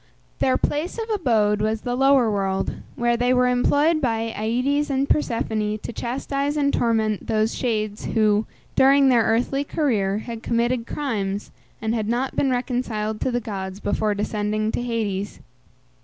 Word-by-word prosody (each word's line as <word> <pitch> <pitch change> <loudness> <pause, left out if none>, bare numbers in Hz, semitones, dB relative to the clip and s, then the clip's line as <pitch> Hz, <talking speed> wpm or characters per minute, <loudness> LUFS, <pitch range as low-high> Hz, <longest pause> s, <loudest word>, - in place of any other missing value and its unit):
Their 130 -1 +3
place 310 +8 -2
of 450 -1 -3
abode 220 - +2
was 215 0 0
the 245 -1 -2
lower 270 -3 +4
world, 195 -1 -1 0.2
where 240 0 +1
they 245 +2 +2
were 250 0 +4
employed 290 +6 +2
by 225 -3 -1
Aïdes 255 +7 0
and 275 0 0
Persephone 220 -7 0
to 225 - -7
chastise 275 +5 -2
and 280 -1 +2
torment 220 -3 0
those 215 +1 +1
shades 215 -4 -2
who, 215 -1 +2 0.3
during 275 +1 +5
their 240 -2 +5
earthly 235 +5 +1
career, 215 -11 0
had 230 +1 -6
committed 235 0 0
crimes, 205 -8 -3 0.3
and 220 0 0
had 220 -3 -1
not 250 +3 -1
been 275 - +2
reconciled 240 -4 -2
to - - +1
the 245 -1 0
gods 195 -3 -5
before 210 0 0
descending 210 +1 -1
to - - -2
Hades. 210 -5 -3
230 Hz, 155 wpm, -23 LUFS, 215-260 Hz, 0.3 s, during